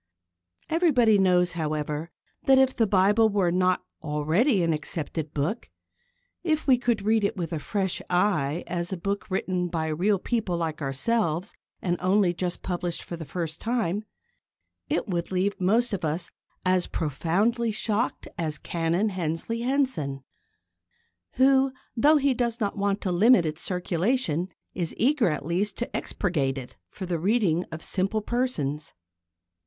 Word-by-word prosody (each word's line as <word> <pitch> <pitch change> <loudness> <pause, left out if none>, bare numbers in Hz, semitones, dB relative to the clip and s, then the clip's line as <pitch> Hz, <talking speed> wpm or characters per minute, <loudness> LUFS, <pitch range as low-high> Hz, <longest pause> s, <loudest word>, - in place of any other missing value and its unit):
Everybody 255 - +4
knows, 180 -2 +3
however, 155 -1 -3 0.4
that 265 0 +7
if 265 0 +4
the 225 - +2
Bible 205 +3 +4
were 195 -4 +2
not 185 0 +1 0.2
already 165 - +2
an 165 -1 +2
accepted 155 0 -4
book 155 +11 -2 0.7
if 315 -3 0
we 255 -3 +5
could 235 -5 0
read 220 +1 +2
it 200 - 0
with 170 -2 -3
a 160 - -1
fresh 190 +3 -1
eye 175 -5 +1
as 175 +1 -3
a 190 - -2
book 200 +4 -3
written 185 -1 -1
by 165 -2 -2
real 190 +7 +2
people 200 -3 -1
like 160 -2 -3
ourselves 165 +5 0 0.3
and 175 -1 0
only 185 -1 +3
just 175 0 -3
published 175 -2 -3
for 170 - -6
the 165 -1 -7
first 160 +1 -5
time 220 -4 -1 0.9
it - - 0
would 175 -2 -2
leave 190 +2 0
most 225 +6 +2
of 190 - -2
us 160 +3 -2 0.3
as 185 -1 +2
profoundly 190 - 0
shocked 215 +2 -1
as 155 -3 -1
Canon 170 +5 0
Hensley 185 +5 -3
Henson, 235 - 0 1.1
who, 265 0 +4 0.2
though 295 +6 +5
he 280 -1 +2
does 235 -1 -1
not 205 -3 -1
want 200 0 0
to 185 - -1
limit 200 +1 +5
its 155 +1 -3
circulation, 180 - 0 0.2
is 175 -3 -3
eager 250 -4 +3
at 150 -3 -3
least 190 +4 -1
to 240 - -4
expurgate 140 -9 -1
it 125 -2 -8
for 185 - -7
the 175 -2 -2
reading 185 -3 +2
of 160 0 -8
simple 195 +3 -1
persons. 160 - -2
185 Hz, 150 wpm, -26 LUFS, 165-220 Hz, 1.1 s, that